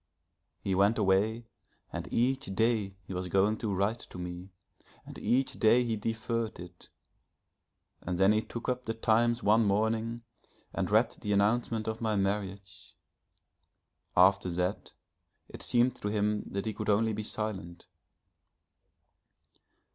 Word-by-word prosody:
He 95 - 0
went 100 +4 +3
away 105 +3 +2 0.5
and - - -5
each 130 +3 +1
day 110 -4 +1
he 95 - -8
was 90 0 -3
going 100 +4 +2
to 110 -4 -3
write 100 +5 0
to - - -10
me, 90 +1 -6 0.6
and - - -10
each 130 +2 0
day 120 +2 +5
he 115 -2 -1
deferred 115 +1 -2
it, 90 0 -12 1.1
and 90 0 -3
then 95 +2 +5
he 110 0 +2
took 120 +1 -7
up 125 0 -1
the 115 - -2
Times 115 +2 +2
one 110 +3 +5
morning 110 +3 0 0.5
and - - -1
read - - +3
the 105 - -1
announcement 110 +2 +1
of 110 +1 -3
my 110 -2 0
marriage. 100 -1 -3 1.2
After 95 +1 +5
that 90 +3 -2 0.6
it - - -9
seemed 125 +1 +2
to - - -2
him 105 0 0
that 100 +1 -3
he 110 - -2
could 105 +1 -4
only 110 +2 +3
be 105 - -3
silent.... 105 -5 -5
105 Hz, 140 wpm, -30 LUFS, 95-115 Hz, 1.2 s, day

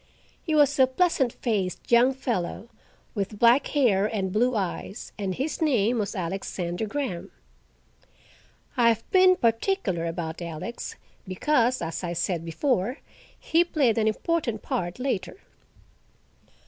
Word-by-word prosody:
He 315 -3 -1
was 285 -2 +4
a 260 - +7
pleasant 265 -3 +1
faced 205 -7 -3
young 245 +3 +5
fellow, 230 -4 -3 0.4
with 205 0 -3
black 240 +5 +5
hair 215 -9 +2
and 195 -4 -2
blue 245 +3 +2
eyes, 195 +1 -4
and 195 -3 -3
his 295 +5 -3
name 245 -6 +2
was 205 - -2
Alexander 180 +1 -3
Graham. 205 -8 -4 1.5
I 240 -2 +4
have 225 -1 +1
been 370 -1 +6
particular 230 - 0
about 165 0 -4
Alex, 170 +8 -6 0.3
because, 245 +5 +1
as 165 +2 -4
I 175 -1 -2
said 175 0 -1
before, 215 - -1 0.4
he 330 +2 +3
played 275 -10 +1
an 220 - +2
important 235 - -1
part 175 0 -3
later. 250 - -3
225 Hz, 130 wpm, -26 LUFS, 185-265 Hz, 1.5 s, a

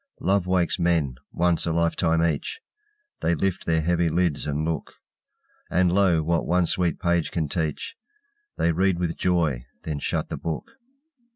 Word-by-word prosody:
Love 95 -1 +1
wakes 90 -1 +1
men, 85 -6 +2 0.2
once 85 -1 +1
a - - +1
lifetime 85 0 +2
each; 80 - -2 0.6
They 85 - +1
lift 95 +2 -2
their 80 -1 +2
heavy 85 0 +2
lids, 85 -3 0
and 75 +1 -1
look; 80 -2 -3 0.7
And, 90 0 +3
lo, 90 -4 +3
what 85 +1 0
one 90 0 +3
sweet 85 -1 0
page 85 -2 +1
can 80 -3 -1
teach, 80 0 -2 0.6
They 85 - +2
read 95 +2 +2
with 85 -2 -1
joy, 80 -9 0 0.2
then 75 -2 -3
shut - - -2
the - - -4
book. 80 -2 -4
85 Hz, 160 wpm, -25 LUFS, 80-90 Hz, 0.7 s, And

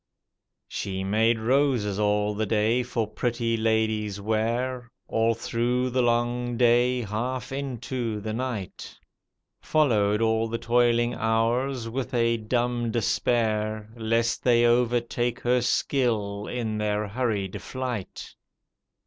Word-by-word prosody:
She 95 -1 -4
made 110 +4 +2
roses 120 -4 +1
all 105 0 +1
the 110 +1 -2
day 110 +4 +2
for 120 -2 -2
pretty 115 +1 -1
ladies' 110 -2 0
wear, 120 +4 -1 0.2
All 115 0 +1
through 120 +2 -1
the 130 +1 +2
long 120 0 0
day, 125 +1 +3
half 125 +4 -3
into 125 -4 -3
the 110 +1 -4
night. 120 -5 -5 0.6
Followed 105 -9 +2
all 110 0 +1
the 115 +1 -3
toiling 120 0 +2
hours 115 +3 0
with 125 +2 -4
a 115 -1 +2
diunb 120 +1 -1
despair 110 -2 0
Lest 115 0 0
they 120 -1 +4
overtake 120 0 +1
her 125 +1 +2
skill 110 -5 0
in 110 -3 -3
their 105 0 -1
hurried 105 -4 -2
flight. 125 -6 -5
115 Hz, 115 wpm, -26 LUFS, 110-125 Hz, 0.6 s, they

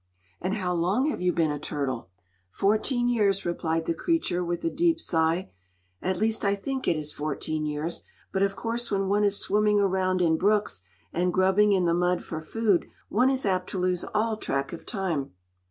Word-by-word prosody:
"And 185 +3 -1
how 185 -4 -1
long 195 - +1
have - - -5
you 180 0 +3
been 165 -3 +1
a 145 - -3
turtle?" 140 -8 -3 0.4
"Fourteen 220 - +1
years," 205 -5 +2
replied 165 -1 -1
the 170 - 0
creature, 180 - 0
with 175 0 -3
a 165 - +1
deep 335 0 +2
sigh. 165 - 0 0.5
"At 185 0 -1
least, 220 +2 0
I 200 0 +2
think 265 +6 -4
it 170 - +3
is 150 -1 -5
fourteen 155 +1 -2
years; 150 +3 -3 0.3
but 190 - 0
of 195 0 +2
course 235 +1 -2
when 195 -1 0
one 205 +1 +3
is 200 -1 +3
swimming 210 0 +2
around 185 -1 +1
in 165 -2 +3
brooks 205 - +1 0.3
and 180 +2 +1
grubbing 190 +3 +4
in 185 -2 +2
the 170 - +3
mud 180 +1 +1
for 160 -1 -5
food, 205 +2 +1 0.2
one 250 +5 +3
is 265 -2 0
apt 185 -2 0
to - - -4
lose 180 -1 0
all 215 +1 +1
track 140 -8 -2
of 170 - -9
time." 175 - -2
185 Hz, 195 wpm, -27 LUFS, 170-210 Hz, 0.5 s, grubbing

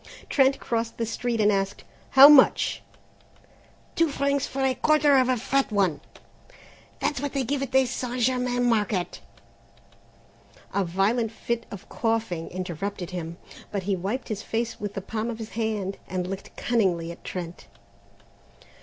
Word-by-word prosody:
Trent 270 -1 +3
crossed 230 -2 -2
the 230 - -1
street 235 +1 -2
and 210 -1 +4
asked: 195 -1 -1 0.3
"How 275 +1 +12
much?" 290 -3 +5 1.1
"Two 330 -1 +3
francs 280 0 0
for 270 0 -3
a 265 -1 +3
quarter 300 0 +3
of 260 -1 +4
a 255 - +2
fat 270 +2 0
one; 185 -8 +1 1.0
that's 290 -3 -1
what 285 -1 -3
they 275 -2 0
give 275 +3 -1
at 270 -2 -3
the 265 0 +4
St. 250 0 -4
Germain 250 0 +1
Market." 210 -5 0 1.5
A 200 - +1
violent 200 +6 +1
fit 230 +1 -3
of 200 - -10
coughing 225 -8 -2
interrupted 185 +1 -5
him, 170 -2 -5 0.3
but 200 -2 -2
he 195 +1 0
wiped 200 +8 -4
his 210 -2 -3
face 230 +1 -3
with 205 -1 -5
the 195 - -3
palm 220 +4 -3
of 230 - -4
his 225 -1 -8
hand 215 -4 -2
and 185 -1 -2
looked 195 +1 -7
cunningly 185 -8 0
at 170 - -12
Trent. 175 -2 -7
225 Hz, 155 wpm, -25 LUFS, 195-255 Hz, 1.5 s, How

